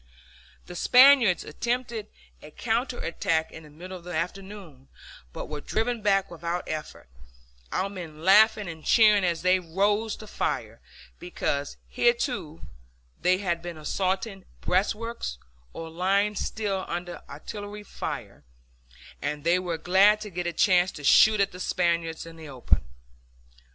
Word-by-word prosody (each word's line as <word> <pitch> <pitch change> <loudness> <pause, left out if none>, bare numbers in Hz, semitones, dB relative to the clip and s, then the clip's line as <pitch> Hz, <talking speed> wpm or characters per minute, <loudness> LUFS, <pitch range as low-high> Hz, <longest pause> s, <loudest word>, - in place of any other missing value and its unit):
The 180 - -10
Spaniards 250 -2 +6
attempted 235 +5 -3 0.3
a 150 - -11
counter 240 - -2
attack 165 -2 -1
in 160 - -10
the 155 - -15
middle 180 +5 -9
of 175 - -10
the 175 -1 -6
afternoon, 180 -5 -6 0.4
but - - -7
were 150 -1 -6
driven 230 +5 -1
back 195 -2 +2
without 170 +1 -3
effort, 155 -1 -6 0.6
our 190 - 0
men 170 -6 -9
laughing 210 +2 +5
and 160 -2 -8
cheering 210 -3 +5
as 170 -2 0
they 185 +1 +4
rose 205 +5 0
to 215 - -11
fire; - - -3 0.4
because 145 -5 -3
hitherto 240 - 0 0.6
they 180 +1 +3
had 175 -4 -2
been 175 -1 -7
assaulting 190 +5 -2
breastworks, 210 - -1 0.3
or 165 - -7
lying 195 +5 +1
still 200 -2 -2
under 175 0 -5
artillery 205 +8 -8
fire, - - -6 0.8
and 150 -1 -3
they 170 +2 +3
were 175 -3 -3
glad 190 +5 +4
to 210 -1 -7
get 175 0 -3
a - - -1
chance 180 +1 +3
to 145 - -10
shoot 215 +8 +6
at 200 - +2
the 180 - -10
Spaniards 170 -3 -1
in 165 0 -12
the 160 -2 -10
open. 130 - 0
185 Hz, 145 wpm, -26 LUFS, 165-210 Hz, 0.8 s, Spaniards